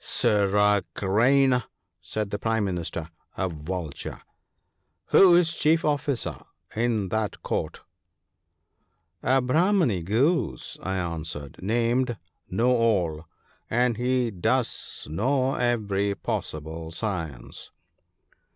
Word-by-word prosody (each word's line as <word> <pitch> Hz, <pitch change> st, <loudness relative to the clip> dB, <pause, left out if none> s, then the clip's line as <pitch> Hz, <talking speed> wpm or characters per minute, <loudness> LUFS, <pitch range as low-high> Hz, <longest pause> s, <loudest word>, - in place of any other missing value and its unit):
' -, -, -20 dB, 0.2 s
Sirrah 105 Hz, 0 st, +3 dB
Crane! 125 Hz, +6 st, +3 dB, 0.2 s
' 95 Hz, -1 st, -53 dB
said 105 Hz, +6 st, -3 dB
the 105 Hz, -, -2 dB
Prime 110 Hz, 0 st, 0 dB
Minister, 85 Hz, -3 st, -3 dB, 0.3 s
a 95 Hz, -, 0 dB
Vulture, 80 Hz, -1 st, -5 dB, 0.5 s
' -, -, -49 dB
who 185 Hz, -3 st, +8 dB
is 170 Hz, -2 st, +4 dB
chief 160 Hz, +1 st, +2 dB
officer 145 Hz, -4 st, -1 dB, 0.4 s
in 110 Hz, -4 st, 0 dB
that 110 Hz, +1 st, -2 dB
court? -, -, -3 dB, 0.7 s
' -, -, -51 dB, 0.6 s
'A 130 Hz, 0 st, +3 dB
Brahmany 155 Hz, -, +2 dB
Goose/ 115 Hz, -, 0 dB
I 95 Hz, 0 st, -2 dB
answered, 80 Hz, -5 st, -5 dB
'named 120 Hz, +4 st, +1 dB, 0.3 s
"Know, 120 Hz, +7 st, +2 dB
all; 90 Hz, -9 st, +1 dB, 0.2 s
" -, -, -36 dB
and 120 Hz, 0 st, +2 dB
he 125 Hz, -1 st, +1 dB
does 90 Hz, -4 st, -2 dB
know 130 Hz, -, +1 dB
every 100 Hz, -5 st, 0 dB
possible 80 Hz, -2 st, -4 dB
science.' 85 Hz, -, -5 dB
105 Hz, 115 wpm, -26 LUFS, 90-125 Hz, 0.7 s, who